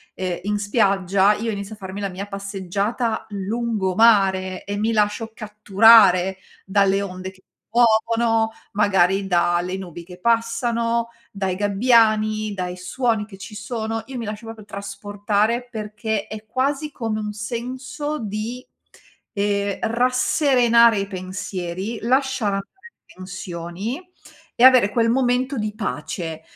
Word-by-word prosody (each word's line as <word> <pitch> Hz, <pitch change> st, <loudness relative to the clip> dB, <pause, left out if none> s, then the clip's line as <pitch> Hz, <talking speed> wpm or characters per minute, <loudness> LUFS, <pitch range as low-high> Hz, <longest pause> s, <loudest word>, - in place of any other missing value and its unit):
ehm, 180 Hz, -2 st, -3 dB
in 205 Hz, +1 st, -1 dB
spiaggia, 200 Hz, -2 st, +2 dB
io 225 Hz, +2 st, -2 dB
inizio 200 Hz, +1 st, -6 dB
a -, -, -23 dB
farmi 195 Hz, 0 st, -7 dB
la 200 Hz, -, -2 dB
mia 190 Hz, +2 st, -6 dB
passeggiata 200 Hz, +3 st, -3 dB
lungomare, 195 Hz, -2 st, +1 dB
e 200 Hz, -, -3 dB
mi 220 Hz, +2 st, 0 dB
lascio 210 Hz, +1 st, 0 dB
catturare 210 Hz, -3 st, +5 dB, 0.3 s
dalle 195 Hz, 0 st, +2 dB
onde 185 Hz, -1 st, -6 dB
che 190 Hz, 0 st, -23 dB
ti -, -, -60 dB, 0.3 s
muovono, 225 Hz, -1 st, +3 dB, 0.2 s
magari, 195 Hz, -1 st, +2 dB
da 175 Hz, -1 st, +2 dB
le 180 Hz, +2 st, -4 dB
nubi 175 Hz, -3 st, -8 dB
che 180 Hz, +1 st, -13 dB
passano, 230 Hz, +1 st, 0 dB, 0.2 s
dai 190 Hz, -2 st, -2 dB
gabbiani, 215 Hz, +1 st, +2 dB
dai 180 Hz, -1 st, -4 dB
suoni 220 Hz, +4 st, -1 dB
che 195 Hz, -3 st, -12 dB
ci 195 Hz, -, -10 dB
sono, 225 Hz, +1 st, -4 dB
io 265 Hz, -1 st, -7 dB
mi 235 Hz, -, -4 dB
lascio 210 Hz, +2 st, -6 dB
proprio 225 Hz, -2 st, -9 dB
trasportare, 205 Hz, +3 st, -2 dB
perché 215 Hz, -1 st, -3 dB
è 215 Hz, 0 st, -8 dB
quasi 280 Hz, +5 st, -1 dB
come 225 Hz, -5 st, -3 dB
un 210 Hz, -1 st, -3 dB
senso 250 Hz, +7 st, -4 dB
di, 220 Hz, +4 st, -5 dB, 0.7 s
ehm, 200 Hz, -1 st, 0 dB
rasserenare 240 Hz, -1 st, +3 dB
i 195 Hz, -, -1 dB
pensieri, 185 Hz, +2 st, -5 dB
lasciar 260 Hz, -3 st, +1 dB
andare 195 Hz, 0 st, -3 dB, 0.4 s
tensioni, 185 Hz, -, -6 dB, 0.6 s
e 235 Hz, -, +1 dB
avere 255 Hz, -5 st, +7 dB
quel 230 Hz, -1 st, +2 dB
momento 255 Hz, +2 st, +1 dB
di 215 Hz, -1 st, -2 dB
pace. 170 Hz, -6 st, -4 dB
210 Hz, 130 wpm, -22 LUFS, 195-230 Hz, 0.7 s, avere